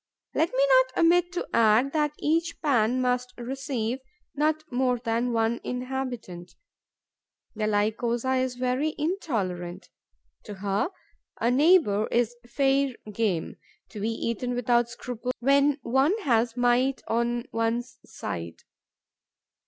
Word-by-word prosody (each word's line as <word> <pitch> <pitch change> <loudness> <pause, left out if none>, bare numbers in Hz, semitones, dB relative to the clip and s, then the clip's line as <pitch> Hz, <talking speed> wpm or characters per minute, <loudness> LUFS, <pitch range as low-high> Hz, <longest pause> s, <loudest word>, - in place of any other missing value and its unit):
Let 325 - +2
me 270 +2 +2
not 260 -1 +4
omit 350 +1 +4
to 355 - -3
add 230 +4 +4
that 300 -1 0
each 330 +2 0
pan 250 -3 +2
must 250 0 -1
receive 255 -1 -3 0.3
not 310 +1 0
more 250 0 +1
than 235 +1 -1
one 230 0 0
inhabitant. 250 -8 -5 1.0
The 215 -1 -2
Lycosa 230 +5 0
is 255 -1 -3
very 255 +5 -1
intolerant. 215 - -3 0.6
To 205 - -7
her, 200 - -1 0.5
a 235 +2 +2
neighbour 270 - +4
is 240 0 0
fair 270 +1 +1 0.2
game, 200 -6 -1 0.3
to 210 - -8
be 215 +3 -1
eaten 235 +2 -2
without 240 -1 +2
scruple 245 +1 -5
when 280 +2 +3
one 265 - +2
has 235 -2 +1
might 245 +2 +2
on 235 +1 0
one's 235 +2 -2
side. 85 -1 -7
245 Hz, 120 wpm, -26 LUFS, 225-270 Hz, 1.0 s, not